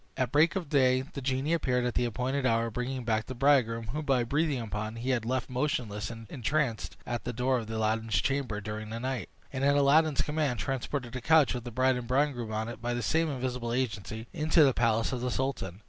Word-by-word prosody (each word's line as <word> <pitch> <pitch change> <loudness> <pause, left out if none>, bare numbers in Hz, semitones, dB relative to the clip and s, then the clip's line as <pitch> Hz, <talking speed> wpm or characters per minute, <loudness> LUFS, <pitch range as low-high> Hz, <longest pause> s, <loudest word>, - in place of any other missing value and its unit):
At 130 -2 0
break 150 +6 +4
of 185 -5 -2
day 130 -3 +3
the 140 0 -8
genie 135 +4 0
appeared 125 -6 +1
at 120 - -1
the 125 - +1
appointed 125 +4 -1
hour, 115 -2 +1
bringing 125 +2 -3
back 110 -1 0
the 130 - -6
bridegroom, 120 -4 +2
whom, 150 +5 -3
by 135 -4 +2
breathing 145 +2 0
upon, 110 0 -4
he 120 +3 -2
had 120 -3 0
left 130 +1 -1
motionless 120 -6 -2
and 115 -1 -8
entranced 135 -2 -1
at 120 0 -3
the 125 - -3
door 125 +2 +1
of 110 -2 -7
Aladdin's 110 0 0
chamber 135 -3 -1
during 105 +1 -6
the 115 +1 -4
night; 125 -5 -3 0.2
and, 130 0 -2
at 140 +1 +4
Aladdin's 145 +1 +4
command, 150 -5 -1
transported 130 +2 -3
the 130 - -4
couch 160 +1 +4
with 125 -1 -5
the - - -4
bride 130 +2 +2
and 120 -1 -5
bridegroom 130 -3 0
on 110 +1 -2
it, 115 -1 -7
by 120 +1 -1
the 120 - -2
same 160 +11 +1
invisible 125 -3 -3
agency, 110 -3 -3
into 155 0 +4
the 135 -3 +4
palace 115 -1 +1
of 125 -2 -3
the 125 - -1
sultan. 120 -9 -2
125 Hz, 225 wpm, -29 LUFS, 115-140 Hz, 0.2 s, break